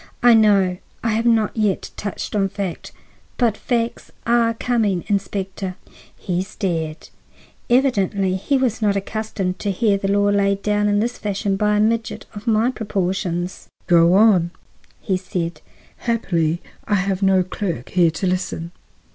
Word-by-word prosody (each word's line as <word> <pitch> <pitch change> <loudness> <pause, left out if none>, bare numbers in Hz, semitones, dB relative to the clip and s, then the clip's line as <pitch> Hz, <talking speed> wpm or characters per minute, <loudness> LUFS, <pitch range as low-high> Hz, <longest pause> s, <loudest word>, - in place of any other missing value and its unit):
"I 245 -1 +8
know. 200 -5 +4 0.3
I 230 - +1
have 225 +2 +1
not 225 -2 +2
yet 210 -4 0
touched 205 +1 -5
on 195 -2 +2
fact. 190 -3 -5 0.5
But 235 -4 +2
facts 235 0 -2 0.2
are 235 -1 +3
coming, 220 -7 0
Inspector." 195 -2 -2 0.4
He 180 -1 -2
stared. 165 -5 -3 0.6
Evidently 200 -7 +2
he 270 +9 0
was 245 -3 0
not 205 -2 +2
accustomed 200 -2 -3
to 205 - -2
hear 200 +1 +2
the 195 - -2
law 205 0 +3
laid 200 -1 +1
down 210 0 +1
in 205 0 +2
this 240 +2 -2
fashion 200 -1 -1
by 210 +1 +2
a - - +2
midget 225 +1 0
of 210 +3 -9
my 225 +2 +3
proportions. 185 -5 -2 0.2
"Go 170 +1 +5
on," 195 -5 +5 0.6
said 185 -2 +1
he; 170 -2 0 0.5
"happily, 175 -8 0 0.2
I 210 - +1
have 195 0 0
no 190 -1 +4
clerk 175 - -4
here 175 -2 +4
to 165 +4 -4
listen." 180 -2 -2
200 Hz, 150 wpm, -21 LUFS, 185-220 Hz, 0.6 s, I